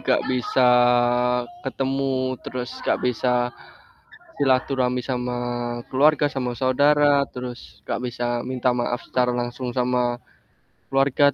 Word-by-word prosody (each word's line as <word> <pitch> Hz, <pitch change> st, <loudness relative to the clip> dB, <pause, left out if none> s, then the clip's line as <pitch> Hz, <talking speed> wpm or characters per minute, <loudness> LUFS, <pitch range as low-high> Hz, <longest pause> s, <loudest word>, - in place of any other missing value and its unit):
enggak -, -, +1 dB
bisa 125 Hz, 0 st, +2 dB, 1.0 s
ketemu 135 Hz, -1 st, -1 dB
terus, 125 Hz, 0 st, -5 dB
enggak -, -, 0 dB
bisa 125 Hz, 0 st, +1 dB, 1.1 s
silaturahmi 130 Hz, -2 st, +1 dB
sama 125 Hz, -1 st, -2 dB, 0.6 s
keluarga, 145 Hz, +2 st, +4 dB
sama 125 Hz, -2 st, -2 dB
saudara, 145 Hz, +2 st, +3 dB
terus 125 Hz, 0 st, -9 dB
enggak -, -, -3 dB
bisa 120 Hz, 0 st, -3 dB, 0.2 s
minta 130 Hz, 0 st, 0 dB
maaf 120 Hz, 0 st, -1 dB
secara 125 Hz, -1 st, 0 dB
langsung 120 Hz, +1 st, -3 dB
sama 125 Hz, -1 st, +1 dB, 0.8 s
keluarga, 135 Hz, +1 st, +3 dB
130 Hz, 105 wpm, -23 LUFS, 125-135 Hz, 1.1 s, keluarga